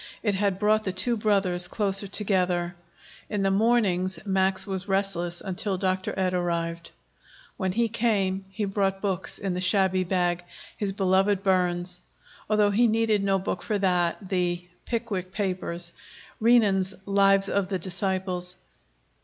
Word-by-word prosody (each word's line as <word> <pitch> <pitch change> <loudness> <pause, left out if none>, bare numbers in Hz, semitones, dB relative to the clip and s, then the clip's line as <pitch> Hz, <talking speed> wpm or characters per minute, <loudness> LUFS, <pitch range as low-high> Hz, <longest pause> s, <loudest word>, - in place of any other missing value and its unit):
It 210 -3 +1
had 195 -1 0
brought 215 +1 +2
the 190 - -1
two 205 +6 0
brothers 195 -5 +2
closer 200 -1 0
together. 180 -3 0 0.6
In 205 -2 -1
the 195 - +2
mornings 195 -4 +2
Max 190 -1 +1
was 190 -2 -4
restless 190 -3 -1
until 190 0 -2
Dr. 185 0 -1
Ed 185 -1 +1
arrived. 170 -1 -2 0.7
When 190 -2 -2
he 230 +3 +2
came, 205 -4 0
he 205 +2 -3
brought 195 -1 0
books 190 -2 -2
in 195 -2 -2
the 180 - -2
shabby 185 0 +3
bag 175 -1 0 0.3
his 205 -2 -2
beloved 195 0 +2
Burns, 180 -2 +1 0.5
although 210 -1 +3
he 235 +4 +4
needed 220 -2 +2
no 195 -1 +2
book 190 - -3
for 215 - -1
that, 180 0 0
the 180 -2 -1 0.2
"Pickwick 215 -6 -3
Papers," 180 -4 -2 0.5
Renan's 205 -5 +3
"Lives 195 0 +4
of 200 -2 0
the 190 - 0
Disciples." 185 0 -2
190 Hz, 145 wpm, -26 LUFS, 180-205 Hz, 0.7 s, he